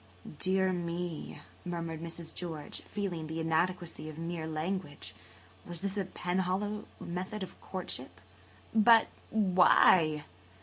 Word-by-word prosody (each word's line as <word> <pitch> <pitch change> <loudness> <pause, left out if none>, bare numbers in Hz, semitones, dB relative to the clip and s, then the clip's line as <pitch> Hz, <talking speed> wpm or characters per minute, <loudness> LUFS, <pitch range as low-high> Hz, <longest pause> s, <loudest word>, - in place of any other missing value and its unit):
"Dear 190 0 +3
me!" 175 -1 -3 0.2
murmured 170 -2 -3
Mrs. 170 -1 -5
George, 160 -4 -5
feeling 180 -6 -3
the 160 +1 -3
inadequacy 165 0 0
of 155 - -9
mere 165 -1 -3
language. 160 -1 -3 0.5
Was 175 0 -5
this 195 0 -2
a 200 -2 0
Penhallow 190 +4 -1
method 185 +4 -4
of 185 - -9
courtship? 130 - -3 0.5
"But 225 +1 +7 0.2
why? 180 -6 +5
175 Hz, 115 wpm, -32 LUFS, 160-190 Hz, 0.5 s, But